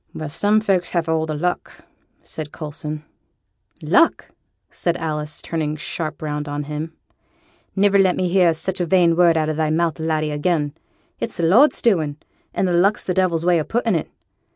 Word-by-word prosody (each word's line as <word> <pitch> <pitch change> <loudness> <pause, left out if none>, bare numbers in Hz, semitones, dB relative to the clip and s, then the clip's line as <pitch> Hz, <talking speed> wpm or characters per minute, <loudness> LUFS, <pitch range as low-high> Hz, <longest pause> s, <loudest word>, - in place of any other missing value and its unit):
'Well! 155 -2 -5
some 210 +8 +2
folks 190 -4 +1
has 170 -2 +1
the 160 - 0 0.3
luck!' 175 +2 -3 0.4
said 155 -2 -5
Coulson. 150 0 -6 0.8
'Luck!' - - +3 0.4
said 170 -1 -1
Alice, 150 -2 -3
turning 155 -2 -2
sharp 155 0 -4
round 150 -1 -3
on 145 0 -3
him. 150 +2 -5 0.8
'Niver 200 0 +4
let 185 -2 +4
me 185 - 0
hear 180 -1 +4
such 185 +3 -2
a 175 - -1
vain 175 -2 +4
word 170 -1 +4
out 155 -1 +1
o' - - 0
thy 155 0 0
mouth, 160 -1 0
laddie, 155 -1 -1
again. 150 -1 0 0.5
It's - - -4
the 170 - -2
Lord's 230 - +4
doing, 160 -10 +2 0.3
and 175 -2 +1
luck's 200 +3 +2
the 180 - -1
devil's 175 -3 +1
way 175 -2 +4
o' - - 0
putting 230 +4 0
it. 165 - -1
165 Hz, 175 wpm, -21 LUFS, 155-180 Hz, 0.8 s, Niver